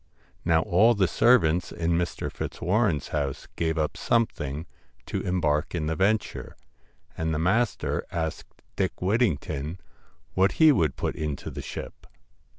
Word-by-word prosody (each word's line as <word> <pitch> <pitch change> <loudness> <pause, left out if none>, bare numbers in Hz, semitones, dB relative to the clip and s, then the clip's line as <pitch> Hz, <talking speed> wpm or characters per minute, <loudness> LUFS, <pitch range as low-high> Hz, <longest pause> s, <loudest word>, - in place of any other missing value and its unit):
Now 80 -1 +3
all 110 +7 +4
the 95 -2 +3
servants 90 -4 +3
in 85 0 -1
Mr. 85 +1 -1
Fitzwarren's 90 - 0
house 70 -3 -2
gave 80 -1 -1
up 75 -1 0
something 80 -10 0 0.4
to - - -3
embark 75 -4 0
in 80 -3 -1
the 80 +1 -1
venture, 105 +4 0 0.6
and 80 0 -1
the 80 - 0
master 100 +9 +1
asked 80 -2 -5
Dick - - -1
Whittington 90 - 0 0.5
what 95 +2 +3
he 160 -1 +6
would 80 - +2
put - - -2
into 75 -2 -4
the - - -6
ship. - - -8
85 Hz, 140 wpm, -26 LUFS, 80-100 Hz, 0.6 s, he